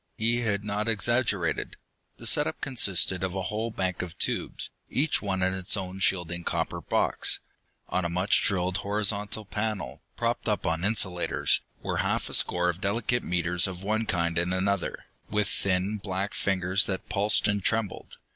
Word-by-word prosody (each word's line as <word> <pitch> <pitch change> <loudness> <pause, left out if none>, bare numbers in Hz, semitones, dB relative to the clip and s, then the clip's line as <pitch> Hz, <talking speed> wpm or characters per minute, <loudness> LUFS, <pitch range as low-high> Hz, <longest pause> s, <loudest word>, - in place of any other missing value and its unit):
He 115 +2 +1
had 105 -3 0
not 105 +1 -2
exaggerated. 110 -5 +1 0.4
The - - -11
set - - +4
up 80 - -4
consisted 95 -8 +2
of 95 0 -2
a 95 - -2
whole 110 +4 -2
bank 95 -4 -2
of 90 -2 -7
tubes, - - -1 0.2
each 150 +3 +1
one 95 -2 -1
in 95 0 +2
its 95 +2 +1
own 95 0 -5
shielding 85 -2 +1
copper - - -2
box. - - +1 0.5
On 95 - -1
a 85 - -1
much 90 +4 +2
drilled 95 -2 +1
horizontal 105 +1 -1
panel, 100 - -3 0.2
propped - - -1
up - - 0
on 80 +1 0
insulators, 95 -4 +1 0.2
were - - -1
half - - 0
a - - -8
score 90 0 +4
of 90 +1 -1
delicate 115 +4 0
meters 90 0 +2
of 95 0 -7
one 110 +2 0
kind 85 -1 +1
and 90 +2 0
another, 100 0 -1 0.2
with 105 -1 +1
thin 95 +2 0
black 95 0 -3
fingers 95 0 +2
that 95 -1 -3
pulsed 105 +1 +3
and 100 -2 0
trembled. 110 -2 -2
95 Hz, 170 wpm, -27 LUFS, 90-105 Hz, 0.5 s, set